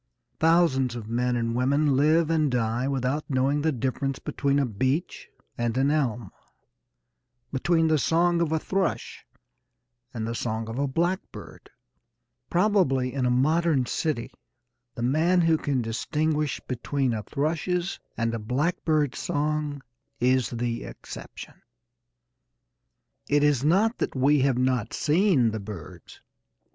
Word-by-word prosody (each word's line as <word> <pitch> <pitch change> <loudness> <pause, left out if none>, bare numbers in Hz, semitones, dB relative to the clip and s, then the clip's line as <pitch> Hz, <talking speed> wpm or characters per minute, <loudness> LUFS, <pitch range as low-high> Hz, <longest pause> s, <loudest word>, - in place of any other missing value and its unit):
Thousands 155 -7 +3
of 115 -3 -7
men 125 +2 0
and 115 -1 -1
women 140 +3 +2
live 155 +4 +3
and 155 -3 +2
die 120 0 0
without 135 +2 -1
knowing 135 +2 +1
the 160 +1 +1
difference 135 +1 -2
between 140 -1 -1
a 140 - +2
beech 130 - -2 0.3
and 120 0 -1
an 135 +2 +3
elm, 120 -9 -1 1.2
between 165 +4 +2
the 155 -1 +3
song 170 +3 +2
of 165 -2 0
a 160 - +2
thrush 190 +3 -2 0.9
and 110 -2 -4
the 115 - -3
song 110 -1 -3
of 115 +3 -5
a 140 - +1
blackbird. 175 +7 -3 0.8
Probably 175 -10 +2
in 130 -2 0
a - - +2
modern 150 +2 +2
city 145 -3 -2 0.6
the 120 - -4
man 160 +8 +3
who 165 -1 +4
can 140 -5 -1
distinguish 150 +6 -1
between 130 +1 -1
a 110 - -2
thrush's 165 - -2 0.2
and 115 0 0
a 115 - -2
blackbird's 150 +4 0
song 150 -1 -2 0.4
is 125 0 +2
the 120 -1 -3
exception. - - -10 1.7
It 145 0 +3
is 145 -3 +3
not 200 +9 +2
that - - -2
we 140 +3 +3
have 135 -2 +2
not 125 -3 0
seen 155 - +3
the 110 - -4
birds. 100 -6 -10
140 Hz, 135 wpm, -26 LUFS, 125-155 Hz, 1.7 s, who